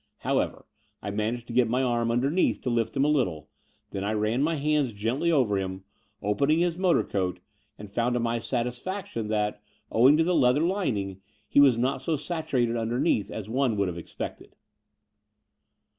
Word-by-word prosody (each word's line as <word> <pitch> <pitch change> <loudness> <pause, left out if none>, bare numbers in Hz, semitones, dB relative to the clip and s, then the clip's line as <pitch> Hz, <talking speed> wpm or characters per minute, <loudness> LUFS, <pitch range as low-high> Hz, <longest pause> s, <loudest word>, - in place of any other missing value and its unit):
However, - - -1 0.4
I 100 - -3
managed 110 +3 -2
to 120 - -8
get 120 -1 +3
my 125 +3 +1
arm 120 -2 +1
xmdemeath 135 +9 +1
to 125 - -1
lift 115 +3 -1
him 135 - +3
a - - +3
little. 90 - 0 0.4
Then 95 - -4
I 105 +2 -1
ran 110 +4 0
my 160 +3 +1
hands 150 -4 +1
gently 120 +11 0
over 125 -10 +2
him, 95 0 -5 0.4
opening 140 +10 +2
his 170 -1 +1
motor 180 -1 +2
coat, 90 -2 -2 0.4
and 105 - -9
fotmd 115 +5 0
to 125 - +1
my 115 0 0
satisfac 125 - -3
tion 115 - -5
that, 105 -1 -1 0.3
owing 130 +6 +6
to 165 - +4
the 180 +2 +1
leather 130 -2 +4
lining, 105 - -1 0.3
he - - +3
was 135 -5 +6
not 130 +2 0
so 160 +4 0
saturated 140 -6 -1
tmderneath 115 -2 0
as 105 -2 -6
one 125 -1 0
would 100 -2 +1
have 85 - -6
ex - - -12
pected. - - -6
120 Hz, 185 wpm, -27 LUFS, 105-140 Hz, 0.4 s, owing